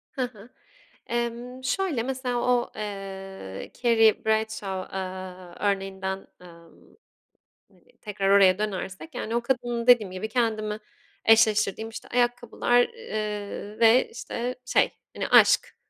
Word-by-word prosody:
Hı 265 - -2
hı, 235 -2 -8 0.6
emm, 240 +2 -3
şöyle, 310 -4 0
mesela, 255 -1 -2
o, 245 0 +1
eee, 195 - -7
Carrie 225 -3 +4
Bradshaw, 220 -4 -1
aaa, 185 -1 -7 0.2
örneğinden, 190 0 -4
ımm, 170 -2 -17 0.7
hani, - - -27 0.2
tekrar 200 -2 -2
oraya 195 -2 +6
dönersek, 205 - -4
yani, 235 -2 -3
o - - +2
kadının, 240 -1 -1
dediğim 240 -6 +6
gibi, 185 +4 -4
kendimi 220 -2 -1 0.5
eşleştirdiğim, 220 -1 +4
işte, 225 - -9
ayakkabılar, 245 0 +2
eee, 210 - -5
ve, 230 +2 +6
işte, 245 +1 -4
şey, - - +3 0.2
hani, - - -2
aşk - - +5
220 Hz, 115 wpm, -26 LUFS, 195-240 Hz, 0.7 s, oraya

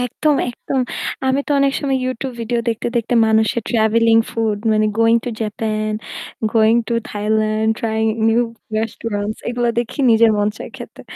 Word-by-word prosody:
একদম, 290 +5 0
একদম। 260 +2 -3 0.5
আমি 265 +1 +2
তো - - -8
অনেক 275 0 +3
সময় 270 -2 0
YouTube 255 0 -4
ভিডিও 235 +1 -1
দেখতে 225 -1 -2
দেখতে 235 +1 0
মানুষের 220 +1 +2
ট্রাভেলিং, 225 0 +3
ফুড 220 -2 -1
মানে 215 0 +2
going 230 0 +5
to 245 - -2
Japan, 215 0 -2 0.6
going 225 0 +4
to 235 - 0 0.2
Thailand, 215 +1 0
trying 220 -1 -1 0.2
new 230 +2 +3 0.4
restaurants 215 -1 -3
এগুলা 240 0 0
দেখি 235 +3 -3
নিজের 225 0 +5
মন 205 0 +2
চাই - - -7
খেতে। - - -10
225 Hz, 155 wpm, -19 LUFS, 220-240 Hz, 0.6 s, going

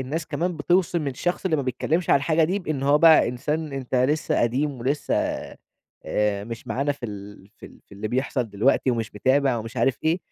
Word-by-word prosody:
الناس 155 +5 -4
كمان 175 0 -2
بتِوصِم 170 -1 +1
الشخص 175 +9 -2
اللي 160 -4 +1
ما 140 - -1
بيتكلّمش 155 +6 -1
عن - - +7
الحاجة 155 +3 +2
دي 185 +5 0
بإن 155 -7 -3
هو 145 +2 +4
بقى 160 -5 +6
إنسان 150 +5 -3
أنت 135 -2 -5
لسّه 135 +5 +1
قديم، 130 +2 0
ولسّه 140 +5 -1 0.9
آآ 105 -1 0
مش 115 0 -8
معانا 140 +2 -1
في 130 -4 -7
ال 100 -1 -10
في - - -12
ال - - -17
في - - -20
اللي 105 +2 -4
بيحصل 125 -1 -1
دلوقتي 125 +6 +2
ومش 115 -4 -3
متابع 130 +3 +2
ومش 115 0 -7
عارف 130 -4 +1
إيه. 165 +3 +2
135 Hz, 200 wpm, -24 LUFS, 120-155 Hz, 0.9 s, عن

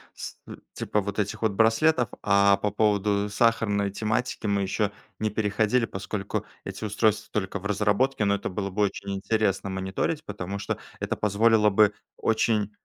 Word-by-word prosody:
с - - -7
м - - -10
типа 105 - -1
вот 100 +1 -4
этих 105 +1 -2
вот 110 -2 +2
браслетов. 115 +6 +3 0.2
А 100 -1 +5
по 105 - -1
поводу 105 0 +1
сахарной 105 -2 +1
тематики 110 +2 -2
мы 100 0 +1
ещё 100 +1 0 0.3
не 110 - 0
переходили, 110 +3 +1
поскольку 95 0 -4 0.2
эти - - -7
устройства 105 +1 +1
только 100 -1 -2
в 95 - -14
разработке. 105 +4 +1
Но 100 0 +3
это 100 - -4
было 100 +1 -3
бы 105 +2 0
очень 100 0 -2
интересно 100 0 0
мониторить, 95 +12 -2
потому 100 -1 -5
что - - -3 0.2
это - - -2
позволило 105 +1 +4
бы 105 +1 +4 0.2
очень 110 -2 +1
105 Hz, 165 wpm, -26 LUFS, 100-110 Hz, 0.3 s, А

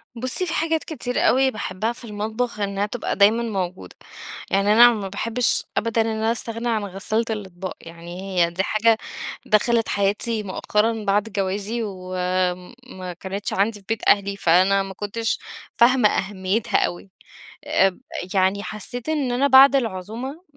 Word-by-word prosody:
بُصِّي، 255 +9 -1
في 335 - -3
حاجات 325 -1 0
كتير 250 -6 -4
أوي 265 +1 +4
باحبَّها 215 0 -3
في 240 - -13
المطبخ 215 +2 -3
إنها 200 0 -1
تبقى 230 +3 -3
دايمًا 215 +4 +4
موجودة، 190 -5 -4 0.6
يعني 200 +2 +3
أنا 240 +2 +8
ما 205 -3 -4
باحبِّش 230 +5 0
أبدًا 230 0 +1
إن 225 - 0
أنا 220 0 0
أستغنى 230 +1 -3
عن 220 -2 0
غسالة 200 +4 -2
الأطباق، 190 -4 -5
يعني 170 +2 -9 0.2
هي - - -3
دي 185 +2 -1
حاجة 220 +2 +3 0.5
دخلت 225 +1 +2
حياتي 210 +2 0
مؤخرًا 210 +3 -1
بعد 200 +1 +2
جوازي 205 +2 -2
و 185 -3 -7 0.7
ما 185 -7 -7
كانِتش 195 +1 -4
عندي 205 +2 0
في 195 - -23
بيت 225 -1 -1
أهلي، 200 0 +3
فأنا 190 +2 +3
ما 195 - -7
كُنتش 210 +3 -2 0.4
فاهمة 240 -2 +5
أهميتها 195 +3 -1
أوي، 175 +2 -7 0.5
اب 190 -1 +2 0.3
يعني 195 +1 +2
حسّيت 225 +6 -4
إن 290 -5 0
أنا 255 +3 +2
بعد 270 +1 +8
العزومة، 235 - -3
215 Hz, 150 wpm, -22 LUFS, 195-235 Hz, 0.7 s, أنا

